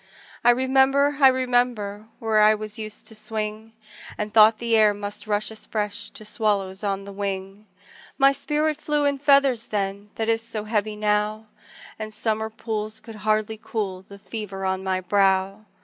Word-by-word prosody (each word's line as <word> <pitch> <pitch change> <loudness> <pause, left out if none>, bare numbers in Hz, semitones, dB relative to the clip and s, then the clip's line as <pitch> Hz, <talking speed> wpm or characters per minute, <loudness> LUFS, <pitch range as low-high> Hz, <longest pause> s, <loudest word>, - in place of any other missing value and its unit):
I 240 - +6
remember, 265 +3 +3
I 270 - +9
remember 245 -5 0
Where 220 -1 +2
I 215 +1 +6
was 215 0 -7
used 215 -1 -6
to - - -11
swing, 215 0 -5 0.4
And 210 0 -4
thought 220 0 +7
the 230 0 +1
air 215 -2 +5
must 205 +1 -6
rush 210 +1 0
as 220 - -9
fresh 210 -2 -3
To 215 - -11
swallows 205 -3 -1
on 195 -1 -1
the 200 - -9
wing; 195 +1 -5 0.5
My 275 0 +6
spirit 300 +2 -1
flew 295 -1 0
in 280 -1 +1
feathers 275 -4 +3
then 200 0 -3
That 225 - -2
is 225 0 +2
so 225 -2 -4
heavy 215 -1 -1
now, 210 +1 0 0.5
The 215 0 -4
summer 220 0 -2
pools 215 -1 -4
could 225 - -11
hardly 215 +1 0
cool 190 -4 -4
The 200 - -11
fever 200 -2 -6
on 190 0 -1
my 185 -1 -1
brow. 195 +2 +1
215 Hz, 170 wpm, -24 LUFS, 205-230 Hz, 0.5 s, I